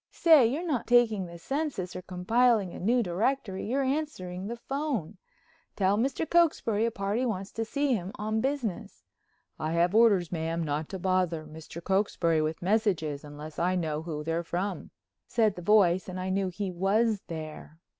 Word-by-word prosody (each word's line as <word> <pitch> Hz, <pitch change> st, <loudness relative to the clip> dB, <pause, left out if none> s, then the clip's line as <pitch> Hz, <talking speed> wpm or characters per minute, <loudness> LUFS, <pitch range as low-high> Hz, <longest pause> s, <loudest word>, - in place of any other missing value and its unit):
"Say, 315 Hz, -8 st, +6 dB
you're 295 Hz, +9 st, -2 dB
not 285 Hz, -8 st, -1 dB
taking 225 Hz, -6 st, +3 dB
the 170 Hz, 0 st, -10 dB
census 270 Hz, -, -3 dB
or -, -, -5 dB
compiling 200 Hz, +2 st, +2 dB
a -, -, -8 dB
new 235 Hz, +5 st, +2 dB
directory, 200 Hz, +2 st, -1 dB
you're 270 Hz, +4 st, +1 dB
answering 230 Hz, -11 st, -3 dB
the 235 Hz, -, -4 dB
phone. 240 Hz, -, -3 dB, 0.6 s
Tell 195 Hz, 0 st, +2 dB
Mr. 270 Hz, +8 st, -1 dB
Cokesbury 265 Hz, -11 st, +2 dB
a -, -, +2 dB
party 205 Hz, +3 st, -2 dB
wants 200 Hz, -5 st, -3 dB
to 225 Hz, -, -3 dB
see 280 Hz, +3 st, 0 dB
him 190 Hz, -4 st, -2 dB
on 215 Hz, +1 st, -1 dB
business." 265 Hz, -8 st, -3 dB, 0.6 s
"I 155 Hz, +1 st, -2 dB
have 170 Hz, +2 st, +2 dB
orders, 210 Hz, -7 st, +4 dB
ma'am, 165 Hz, 0 st, -2 dB
not 150 Hz, 0 st, -2 dB
to 190 Hz, -, -5 dB
bother 180 Hz, -3 st, 0 dB
Mr. 160 Hz, +2 st, -10 dB
Cokesbury 180 Hz, -5 st, +1 dB
with 155 Hz, +2 st, -3 dB
messages 180 Hz, -8 st, 0 dB
unless 150 Hz, +1 st, -9 dB
I 180 Hz, +2 st, +1 dB
know 155 Hz, -4 st, -1 dB
who 155 Hz, -2 st, -5 dB
they're 165 Hz, +2 st, -1 dB
from," 180 Hz, +3 st, -3 dB, 0.4 s
said 220 Hz, -4 st, +2 dB
the 180 Hz, -, -7 dB
voice, 185 Hz, -2 st, +3 dB
and 185 Hz, -, -5 dB
then 185 Hz, -, -3 dB
I -, -, -2 dB
knew 195 Hz, 0 st, 0 dB
he 190 Hz, +1 st, -4 dB
was 200 Hz, +4 st, +1 dB
there. 155 Hz, -1 st, -7 dB
190 Hz, 175 wpm, -28 LUFS, 170-230 Hz, 0.6 s, Say